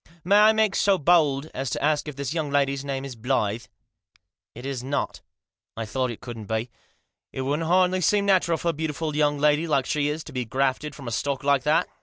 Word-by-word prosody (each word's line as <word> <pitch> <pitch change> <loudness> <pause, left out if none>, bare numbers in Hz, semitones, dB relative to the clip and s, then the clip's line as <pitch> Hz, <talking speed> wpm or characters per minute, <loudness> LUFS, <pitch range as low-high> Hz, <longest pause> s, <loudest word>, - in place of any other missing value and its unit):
May 200 +4 +4
I 215 +1 +7
make 220 -2 +2
so 200 -1 +3
bold 155 -3 +2
as 135 0 -3
to - - -3
ask 150 0 +1
if 150 - -6
this 140 +1 -3
young 160 -3 -2
lady's 140 -1 +1
name 135 -1 -3
isBlyth?" 115 -4 -2 0.4
" - - -40
It 120 +3 -9
is 135 -3 -4
not" 140 +2 -3 0.3
" - - -52
I 115 - -3
thought 130 +3 -1
it 115 - -7
couldn't 115 -4 -8
be. 110 +2 -2 0.6
It 130 - -4
wouldn't 145 +5 -1
hardly 185 +1 +3
seem 200 +4 +2
natural 185 -4 +3
for 170 - -1
a - - 0
beautiful 155 0 -3
young 145 -1 +2
lady 150 +3 +2
like 140 -4 +1
she 145 +1 0
is 155 +1 -4
to 150 - -11
be 125 -1 -2
grafted 135 +5 -1
from 135 -4 -10
a - - -3
stock 140 +4 -2
like 140 -1 +3
that. 150 +2 +3
145 Hz, 225 wpm, -25 LUFS, 130-160 Hz, 0.6 s, I